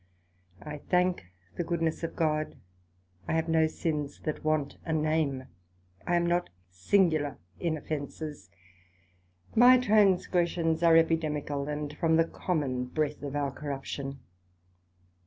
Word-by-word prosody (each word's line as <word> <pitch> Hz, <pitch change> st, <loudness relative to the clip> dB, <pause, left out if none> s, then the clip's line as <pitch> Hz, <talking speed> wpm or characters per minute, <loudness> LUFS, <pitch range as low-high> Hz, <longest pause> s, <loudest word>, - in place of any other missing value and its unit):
I 150 Hz, -1 st, -6 dB
thank 180 Hz, -, +1 dB, 0.3 s
the 175 Hz, -, 0 dB
goodness 165 Hz, -1 st, -1 dB
of 165 Hz, -, -3 dB
God, 155 Hz, -2 st, 0 dB, 0.7 s
I -, -, -1 dB
have 160 Hz, 0 st, +1 dB
no 160 Hz, -1 st, +3 dB
sins 150 Hz, -3 st, -3 dB
that 155 Hz, -, -4 dB
want 155 Hz, -2 st, 0 dB
a 165 Hz, -, -4 dB
name; 155 Hz, -4 st, 0 dB, 0.6 s
I 175 Hz, -, +2 dB
am 170 Hz, 0 st, +2 dB
not 175 Hz, +1 st, +1 dB, 0.2 s
singular 155 Hz, -, +2 dB, 0.2 s
in 165 Hz, -3 st, -1 dB
offences; 150 Hz, -, -6 dB, 1.0 s
my 245 Hz, +2 st, +8 dB
transgressions 180 Hz, -7 st, +2 dB
are 165 Hz, -1 st, +6 dB
Epidemical, 150 Hz, -3 st, 0 dB
and 150 Hz, 0 st, -4 dB
from 160 Hz, 0 st, +2 dB
the 165 Hz, 0 st, +4 dB
common 140 Hz, -8 st, -2 dB
breath 150 Hz, +2 st, -2 dB
of 145 Hz, -1 st, -5 dB
our 140 Hz, -1 st, 0 dB
corruption. 135 Hz, -1 st, -5 dB
155 Hz, 125 wpm, -29 LUFS, 145-170 Hz, 1.0 s, my